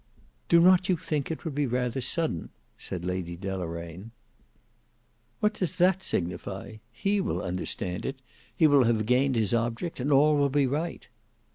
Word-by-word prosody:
"Do 170 - +7
not 185 +2 +5
you 180 - +3
think 150 -4 -2
it 160 +2 -5
would 160 - -3
be 145 0 0
rather 125 +1 -1
sudden?" 160 - -1 0.3
said 90 -2 -6
Lady 90 -2 -3
Deloraine. 90 0 -5 1.3
"What 210 +1 +2
does 185 -3 -3
that 185 +1 +3
signify? 95 - -4
He 195 +12 0
will 200 - -1
understand 90 0 -3
it; 135 0 -4 0.4
he 160 - +5
will 145 -4 +5
have 110 -2 +1
gained 130 +3 +2
his 110 -3 +2
object; 120 +8 -1
and 135 +4 -1
all 150 +2 +5
will 140 -1 +3
be 140 0 +2
right." 150 +6 -3
130 Hz, 160 wpm, -27 LUFS, 95-165 Hz, 1.3 s, Do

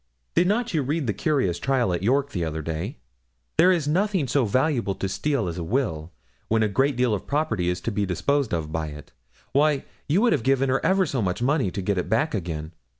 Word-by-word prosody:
'Did 175 +1 +3
not 225 +2 0
you 155 - +2
read 145 +3 -1
the 110 - 0
curious 105 - 0
trial 130 -8 +1
at 85 - -2
York, 135 +7 +1
the 90 - -2
other 80 -1 -3
day? 85 - -4 0.6
There 180 +3 +7
is 165 -5 +1
nothing 185 -1 +1
so 135 0 +2
valuable 120 -3 +1
to 95 - -2
steal 135 +1 -1
as 85 +1 -4
a - - -3
will, 85 - -1 0.4
when 110 0 +2
a - - +3
great 135 +7 +1
deal 125 -2 +2
of 100 - -4
property 110 - 0
is 90 - -1
to 115 - -2
be 105 -1 -1
disposed 140 - 0
of 80 -3 -2
by 80 0 -2
it. 75 0 -10 0.4
Why, 145 0 +2 0.2
you 175 +8 +3
would 240 -1 +4
have - - +1
given 135 +2 +2
her 135 +1 +1
ever 190 0 +3
so 130 -7 -2
much 95 +3 -1
money 135 -5 +2
to 95 +1 -5
get 95 0 0
it - - -3
back 115 +9 +1
again. 85 -5 -4
120 Hz, 230 wpm, -25 LUFS, 90-145 Hz, 0.6 s, There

